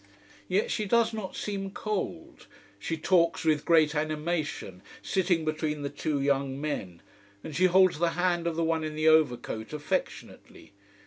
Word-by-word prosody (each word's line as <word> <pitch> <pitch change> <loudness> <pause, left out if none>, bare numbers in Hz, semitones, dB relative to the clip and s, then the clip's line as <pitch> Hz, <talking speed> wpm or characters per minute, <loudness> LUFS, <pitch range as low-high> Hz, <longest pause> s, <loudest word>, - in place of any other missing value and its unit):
Yet 195 +4 0
she 215 - -1
does 230 +2 +2
not 215 -4 -5
seem 195 -2 -4
cold. 200 - -5 0.3
She 165 +10 -3
talks 170 0 +2
with 155 -2 +2
great 160 -3 +4
animation, 155 - -3 0.2
sitting 180 -4 +1
between 155 -1 -2
the 140 - -3
two 150 -2 -2
young 140 -1 0
men. 95 - -4 0.4
And 155 - -7
she 185 - +3
holds 185 -2 +4
the 170 -1 +1
hand 175 -1 +1
of 165 - -1
the 165 - 0
one 160 -1 0
in 155 -1 -4
the 155 +1 +1
overcoat 125 -7 +2
affectionately. 145 -7 -5
160 Hz, 155 wpm, -28 LUFS, 150-180 Hz, 0.4 s, great